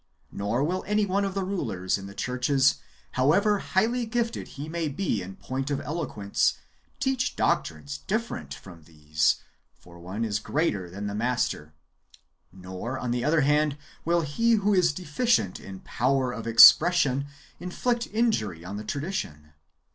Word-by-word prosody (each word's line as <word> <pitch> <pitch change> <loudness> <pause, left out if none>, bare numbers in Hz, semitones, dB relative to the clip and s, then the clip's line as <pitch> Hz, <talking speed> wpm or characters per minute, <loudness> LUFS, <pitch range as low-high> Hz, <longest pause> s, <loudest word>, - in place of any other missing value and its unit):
Nor 105 +6 -1
will 180 +5 -1
any 210 0 +2
one 200 +1 0
of 195 -1 -3
the 195 - -1
rulers 115 - -2
in 100 -1 -6
the 100 - -11
churches, 130 +2 +2 0.3
however 195 +11 +3
highly 230 +6 0
gifted 235 0 -2
he 145 +2 -5
may 165 0 -2
be 145 - -1
in 95 +1 -8
point 135 +6 -4
of 140 - -1
eloquence, 135 -10 -1 0.4
teach 265 -1 0
doctrines 70 -2 -1
different 230 +4 -3
from 85 -5 -11
these 75 -1 0 0.3
(for 85 -1 -16
no - - -14
one 95 +6 -3
is 105 -1 -1
greater 105 - -1
than 100 +4 -6
the 100 - -3
Master); 105 -10 -2 0.8
nor, 95 +7 -6
on 125 -2 -3
the 120 0 -1
other 155 +1 +3
hand, 150 +1 +2 0.3
will 170 +1 +2
he 230 +10 +1
who 210 -1 +2
is 180 -4 +4
deficient 155 - 0
in 95 -1 -10
power 130 +1 0
of 115 -1 -6
expression 140 +3 +7 0.3
inflict 235 +7 -2
injury 110 - -1
on 100 +3 -6
the 105 - -6
tradition. 105 - -5
135 Hz, 155 wpm, -26 LUFS, -, 0.8 s, expression